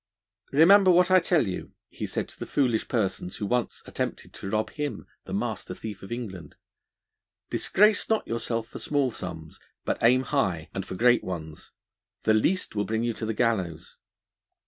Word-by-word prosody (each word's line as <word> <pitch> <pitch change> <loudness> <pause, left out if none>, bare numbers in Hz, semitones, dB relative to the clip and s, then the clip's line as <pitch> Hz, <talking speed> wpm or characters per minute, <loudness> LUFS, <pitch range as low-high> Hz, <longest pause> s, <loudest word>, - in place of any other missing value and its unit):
'Remember 185 +7 +7
what 180 +1 +5
I 185 - +8
tell 165 -5 +2
you,' 95 -2 -5
he - - -6
said - - -2
to - - -14
the - - -5
foolish 125 -6 +1
persons 95 -6 -1
who 105 - -3
once 125 +3 -1
attempted - - -4
to 95 - -6
rob 110 +1 -1
him, 145 -8 -4 0.2
the - - -9
master - - -3
thief 105 -3 -7
of 95 - -10
England, 95 -10 -6 1.0
'disgrace 210 +1 +3
not 220 -1 +1
yourself 115 0 -2
for - - -9
small 140 -4 +1
sums, 80 -7 -7 0.3
but - - -1
aim 125 +3 +5
high, 95 - -1
and 95 0 -4
for - - -5
great 120 +4 +4
ones; 80 -4 -7 0.5
the 110 - +4
least 165 - +1
will 105 - 0
bring 110 +1 -1
you 120 -1 0
to 110 - -5
the 110 - -2
gallows.' 95 -9 -1
115 Hz, 175 wpm, -27 LUFS, 95-140 Hz, 1.0 s, I